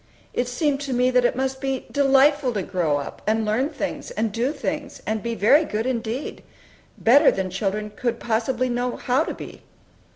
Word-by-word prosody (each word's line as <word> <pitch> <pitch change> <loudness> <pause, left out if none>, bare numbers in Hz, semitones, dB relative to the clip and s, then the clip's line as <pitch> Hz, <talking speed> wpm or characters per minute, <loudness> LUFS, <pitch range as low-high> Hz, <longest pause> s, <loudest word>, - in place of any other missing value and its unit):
It 245 - 0
seemed 275 +3 0
to 275 -2 -3
me 250 +1 +2
that 250 -1 +3
it 245 - +2
must 265 +1 -2
be 270 -2 -2
delightful 275 -1 +4
to 200 -3 -2
grow 170 -7 0
up, 140 - -7
and 220 0 +1
learn 230 +7 +1
things, - - -5
and 230 - -2
do 235 +6 0
things, 295 0 -4
and 220 0 -1
be 235 +1 -3
very 270 +10 +5
good 220 -6 -3
indeed, 245 +1 -3 0.6
better 255 +6 +6
than 190 -1 -2
children 210 +2 -2
could 240 -2 -2
possibly 240 +2 0
know 245 0 -1
how 260 +5 +1
to - - -5
be. - - -10
245 Hz, 190 wpm, -23 LUFS, 220-270 Hz, 0.6 s, better